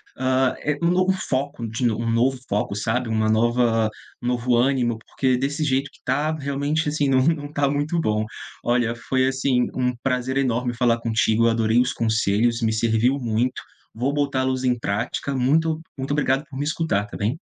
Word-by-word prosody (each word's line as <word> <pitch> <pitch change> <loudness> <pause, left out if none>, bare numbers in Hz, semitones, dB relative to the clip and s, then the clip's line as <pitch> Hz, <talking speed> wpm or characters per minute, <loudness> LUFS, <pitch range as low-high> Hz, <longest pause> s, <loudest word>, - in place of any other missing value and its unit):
hã, 130 0 +1
é 150 0 -1
um - - +4
um - - +3
novo 185 +1 +3
foco 140 -8 -3
de 115 +2 0
um 115 +2 -3
novo 125 +3 +2
foco, 100 0 -1
sabe, 115 +3 -1
uma 110 -1 +1
nova 115 0 +2 0.3
um 120 - -4
novo 125 0 +1
ânimo, 120 -2 +1
porque, 130 -2 +1
desse 140 +4 -1
jeito 135 -1 0
que - - -22
está, 145 +5 0
realmente, 145 +1 -1
assim, 145 -2 0
não 130 -1 +4
não 160 -2 +1
está 145 -1 0
muito 145 +4 0
bom. 110 -6 0 0.4
Olha, 120 -1 +1
foi, 130 +3 0
assim, 130 -2 +1
um 125 -1 0
prazer 130 0 -1
enorme 125 -2 0
falar 115 -1 +2
contigo. 115 0 +2
Eu - - +5
adorei 115 +1 +2
os 125 +3 +2
conselhos, 110 +1 +1
me 110 -1 +1
serviu 115 +4 +2
muito. 120 +1 -1 0.3
Vou 130 +5 -1
botá-los 130 -3 0
em 125 -1 +2
prática. 115 +5 -2
Muito 155 +5 +1 0.2
muito 135 +1 -4
obrigado 140 -1 +1
por 135 -4 -9
me 145 - -1
escutar, 150 -9 -1
tá - - -8
bem? 110 +9 -1
125 Hz, 190 wpm, -23 LUFS, 115-140 Hz, 0.4 s, Eu